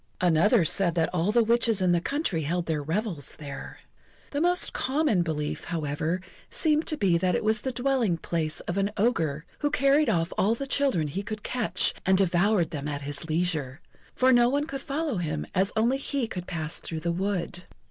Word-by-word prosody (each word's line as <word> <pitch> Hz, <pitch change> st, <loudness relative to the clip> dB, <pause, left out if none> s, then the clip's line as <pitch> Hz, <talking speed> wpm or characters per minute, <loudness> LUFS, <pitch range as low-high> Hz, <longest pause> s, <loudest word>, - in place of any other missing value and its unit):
Another 180 Hz, +4 st, +4 dB
said 175 Hz, +1 st, +2 dB
that 165 Hz, -2 st, +1 dB
all 180 Hz, +3 st, +1 dB
the 235 Hz, +1 st, +4 dB
witches 230 Hz, -2 st, +2 dB
in 185 Hz, -1 st, +2 dB
the 175 Hz, -1 st, +2 dB
country 275 Hz, -, -1 dB
held 170 Hz, +3 st, -1 dB
their 155 Hz, -2 st, -1 dB
revels 165 Hz, -, -2 dB
there. 145 Hz, -2 st, -9 dB, 0.5 s
The 285 Hz, -, -1 dB
most 355 Hz, +1 st, +3 dB
common 265 Hz, -, +1 dB
belief, 150 Hz, -3 st, -3 dB
however, 160 Hz, +2 st, -2 dB, 0.3 s
seemed 310 Hz, -1 st, +1 dB
to 310 Hz, -, +1 dB
be 180 Hz, -8 st, +2 dB
that 180 Hz, 0 st, +1 dB
it -, -, -1 dB
was 215 Hz, 0 st, +1 dB
the 260 Hz, -, -2 dB
dwelling 245 Hz, -7 st, +1 dB
place 160 Hz, -2 st, -3 dB
of 175 Hz, +3 st, -3 dB
an 195 Hz, +1 st, +1 dB
ogre, 165 Hz, -9 st, 0 dB
who 290 Hz, -, +1 dB
carried 285 Hz, 0 st, +3 dB
off 170 Hz, -5 st, 0 dB
all 215 Hz, +4 st, +3 dB
the 275 Hz, -, -4 dB
children 270 Hz, -, +1 dB
he 165 Hz, +7 st, -3 dB
could 215 Hz, 0 st, -6 dB
catch, 225 Hz, -7 st, +1 dB
and 190 Hz, 0 st, +3 dB
devoured 185 Hz, -1 st, +2 dB
them 150 Hz, -3 st, -4 dB
at 145 Hz, -1 st, -4 dB
his 145 Hz, +2 st, -5 dB
leisure; 155 Hz, -5 st, -1 dB, 0.4 s
for 260 Hz, 0 st, +4 dB
no 240 Hz, 0 st, +5 dB
one 285 Hz, +3 st, 0 dB
could 275 Hz, -3 st, -6 dB
follow 290 Hz, -3 st, -2 dB
him, 150 Hz, -, -2 dB
as 190 Hz, +2 st, +1 dB
only 240 Hz, +5 st, +2 dB
he 275 Hz, -2 st, -2 dB
could 180 Hz, -4 st, -6 dB
pass 160 Hz, -3 st, -3 dB
through 160 Hz, -1 st, -5 dB
the 170 Hz, -, -1 dB
wood. 180 Hz, -1 st, -3 dB
185 Hz, 200 wpm, -27 LUFS, 165-245 Hz, 0.5 s, no